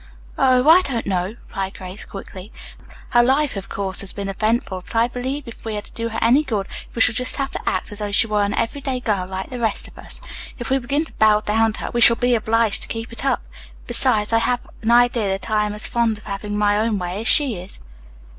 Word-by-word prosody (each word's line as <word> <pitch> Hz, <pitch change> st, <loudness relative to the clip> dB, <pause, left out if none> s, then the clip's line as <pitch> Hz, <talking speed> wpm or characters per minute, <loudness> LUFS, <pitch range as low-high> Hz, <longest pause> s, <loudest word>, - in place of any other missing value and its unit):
"Oh, 255 Hz, 0 st, +3 dB
I 335 Hz, +4 st, +8 dB
don't 250 Hz, -9 st, -3 dB
know," 180 Hz, -3 st, 0 dB, 0.2 s
replied 195 Hz, 0 st, -4 dB
Grace 185 Hz, +2 st, -8 dB
quickly. 195 Hz, +1 st, -9 dB, 0.6 s
"Her 240 Hz, -, +5 dB
life, 270 Hz, +3 st, +2 dB
of 195 Hz, 0 st, -6 dB
course, 195 Hz, -1 st, +1 dB
has 195 Hz, -, -1 dB
been 200 Hz, -1 st, -5 dB
eventful, 215 Hz, -1 st, -1 dB
but 185 Hz, -, -9 dB
I 230 Hz, +1 st, +4 dB
believe 260 Hz, +3 st, -4 dB
if 235 Hz, -, -11 dB
we 220 Hz, -2 st, -3 dB
are -, -, -3 dB
to -, -, -10 dB
do 230 Hz, 0 st, -3 dB
her 225 Hz, -, -5 dB
any 250 Hz, +6 st, +5 dB
good 215 Hz, -8 st, -2 dB, 0.3 s
we 230 Hz, -, -1 dB
shall 240 Hz, -, +6 dB
just 250 Hz, +2 st, 0 dB
have 275 Hz, -1 st, -2 dB
to -, -, -2 dB
act 185 Hz, -, -3 dB
as 205 Hz, -, -5 dB
though 205 Hz, -1 st, -3 dB
she 200 Hz, -, +4 dB
were 210 Hz, -2 st, 0 dB
an 200 Hz, 0 st, 0 dB
everyday 260 Hz, +2 st, -2 dB
girl 200 Hz, -6 st, -1 dB
like 190 Hz, +3 st, -6 dB
the 250 Hz, -, -5 dB
rest 225 Hz, -3 st, -1 dB
of -, -, -16 dB
us. -, -, -3 dB, 0.4 s
If 240 Hz, 0 st, -6 dB
we 270 Hz, -, +3 dB
begin 280 Hz, +5 st, -1 dB
to -, -, -13 dB
bow 215 Hz, -1 st, +4 dB
down 220 Hz, +1 st, +1 dB
to -, -, -7 dB
her, -, -, -4 dB
we 240 Hz, -, 0 dB
shall 235 Hz, 0 st, +9 dB
be 245 Hz, +1 st, +1 dB
obliged 225 Hz, -2 st, +1 dB
to -, -, -8 dB
keep 225 Hz, +1 st, -5 dB
it 230 Hz, -, -8 dB
up. -, -, +1 dB, 0.4 s
Besides, 210 Hz, -, +2 dB
I 225 Hz, -, +5 dB
have 245 Hz, +1 st, 0 dB, 0.2 s
an 225 Hz, -, -1 dB
idea 240 Hz, -2 st, +4 dB
that 195 Hz, +3 st, -3 dB
I 210 Hz, -1 st, +2 dB
am 210 Hz, -, -4 dB
as 210 Hz, -, -6 dB
fond 235 Hz, -3 st, 0 dB
of 210 Hz, -, -14 dB
having 205 Hz, 0 st, -4 dB
my 205 Hz, 0 st, +2 dB
own 220 Hz, -1 st, +1 dB
way 180 Hz, +2 st, -4 dB
as 225 Hz, -, -3 dB
she 270 Hz, -9 st, +3 dB
is." 180 Hz, +2 st, -5 dB
225 Hz, 250 wpm, -21 LUFS, 205-245 Hz, 0.6 s, shall